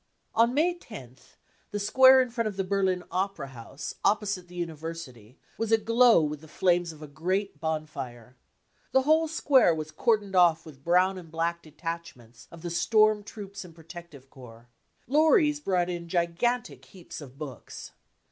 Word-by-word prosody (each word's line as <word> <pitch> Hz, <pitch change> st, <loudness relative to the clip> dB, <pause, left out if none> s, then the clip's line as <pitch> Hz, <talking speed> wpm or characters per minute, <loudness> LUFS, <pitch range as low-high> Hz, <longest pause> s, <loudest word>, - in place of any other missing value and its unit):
On 235 Hz, +3 st, +3 dB
May 335 Hz, +4 st, +3 dB
10th 135 Hz, -, -13 dB, 0.3 s
the 205 Hz, -, -4 dB
square 260 Hz, +5 st, +6 dB
in 250 Hz, -, -8 dB
front 230 Hz, -1 st, -1 dB
of 205 Hz, -2 st, -5 dB
the 195 Hz, -, 0 dB
Berlin 190 Hz, -1 st, 0 dB
opera 185 Hz, -6 st, -2 dB
house, 130 Hz, +3 st, -8 dB
opposite 200 Hz, -3 st, 0 dB
the 180 Hz, -, -14 dB
university, 160 Hz, -8 st, -7 dB, 0.2 s
was 225 Hz, -1 st, -2 dB
aglow 230 Hz, -3 st, +5 dB
with 150 Hz, -1 st, -3 dB
the 160 Hz, -, -14 dB
flames 175 Hz, +1 st, +1 dB
of 155 Hz, -1 st, -13 dB
a -, -, -8 dB
great 185 Hz, +4 st, -2 dB
bonfire. 140 Hz, -6 st, -5 dB, 0.6 s
The 265 Hz, -, +4 dB
whole 315 Hz, +3 st, +3 dB
square 275 Hz, -, +3 dB
was 155 Hz, 0 st, -6 dB
cordoned 210 Hz, -2 st, 0 dB
off 170 Hz, -2 st, +4 dB
with 140 Hz, -4 st, -14 dB
brown 185 Hz, +3 st, +2 dB
and 170 Hz, -3 st, -13 dB
black 165 Hz, +1 st, -2 dB
detachments 155 Hz, -8 st, -8 dB
of 170 Hz, 0 st, -13 dB
the 175 Hz, -, -4 dB
storm 215 Hz, +4 st, +3 dB
troops 200 Hz, -1 st, -9 dB
and 170 Hz, -3 st, -14 dB
pro 165 Hz, -, -16 dB
tective 165 Hz, -5 st, -12 dB
corps. 120 Hz, -2 st, -14 dB, 0.4 s
Lorries 300 Hz, -, +3 dB
brought 185 Hz, -10 st, 0 dB
in 175 Hz, -1 st, -5 dB
gigantic 175 Hz, +9 st, -1 dB
heaps 180 Hz, -4 st, -11 dB
of 135 Hz, -2 st, -12 dB
books. 145 Hz, -4 st, -9 dB
175 Hz, 165 wpm, -27 LUFS, 155-215 Hz, 0.6 s, square